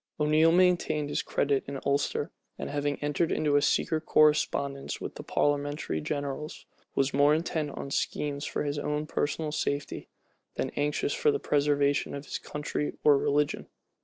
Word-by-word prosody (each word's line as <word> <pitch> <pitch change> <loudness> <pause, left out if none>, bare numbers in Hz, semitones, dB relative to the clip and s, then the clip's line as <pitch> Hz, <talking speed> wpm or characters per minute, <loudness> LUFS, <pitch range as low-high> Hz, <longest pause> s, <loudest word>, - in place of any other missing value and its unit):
O'Neal 155 +2 +4
maintained 175 -4 +2
his - - 0
credit 140 -1 0
in 140 0 -4
Ulster; 145 +2 0 0.3
and - - -5
having 145 0 -1
entered 145 +3 0
into 150 -2 +1
a 145 - +5
secret 155 +2 +1
correspondence 140 -2 +2
with - - -6
the - - -8
parliamentary 145 - -1
generals, 145 - -4 0.3
was 135 0 +1
more 145 +2 +5
intent 160 -2 -1
on 140 - -5
schemes 145 0 -2
for - - -2
his 145 0 -2
own 150 +1 -2
personal 155 0 -2
safety, 145 -1 -3 0.5
than - - -2
anxious 150 - -1
for 480 -2 +2
the 425 - +2
preservation 145 - +1
of 140 0 -7
his - - -4
country 150 0 -3
or 150 -1 +7
religion. 145 +1 0
145 Hz, 160 wpm, -28 LUFS, 140-155 Hz, 0.5 s, or